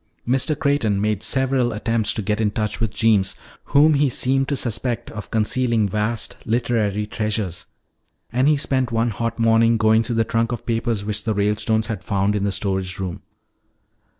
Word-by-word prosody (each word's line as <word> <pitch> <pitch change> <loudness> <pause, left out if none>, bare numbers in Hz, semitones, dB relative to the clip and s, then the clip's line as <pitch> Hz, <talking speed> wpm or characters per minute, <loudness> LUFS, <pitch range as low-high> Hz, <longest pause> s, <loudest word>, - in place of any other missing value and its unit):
Mr. 135 +4 +1
Creighton 140 -9 +1
made 105 -1 0
several 130 -2 +1
attempts 110 0 -1
to 110 - -3
get 105 +2 -1
in 105 - +2
touch 105 0 -3
with 115 -3 -1
Jeems, 105 -3 +2 0.3
whom 150 +2 +4
he 145 -1 +3
seemed 135 +2 +1
to 140 - -1
suspect 120 -1 -2
of 105 -2 -8
concealing 115 0 +1
vast 105 +3 -2
literary 110 -3 0
treasures. 105 -4 -3 0.7
And 130 +3 +2
he 150 -1 +4
spent 130 -3 0
one 115 +1 +1
hot 115 +2 -3
morning 115 0 +3
going 110 0 +4
through 115 +1 -3
the 115 - +3
trunk 115 +1 0
of 120 - -5
papers 115 -3 -1
which 105 0 -2
the 110 -2 -1
Ralestones 105 +2 +1
had 110 -4 -5
found 100 0 0
in 100 -1 -1
the 100 - 0
storage 95 -2 -2
room. 95 -3 -5
115 Hz, 180 wpm, -21 LUFS, 105-120 Hz, 0.7 s, whom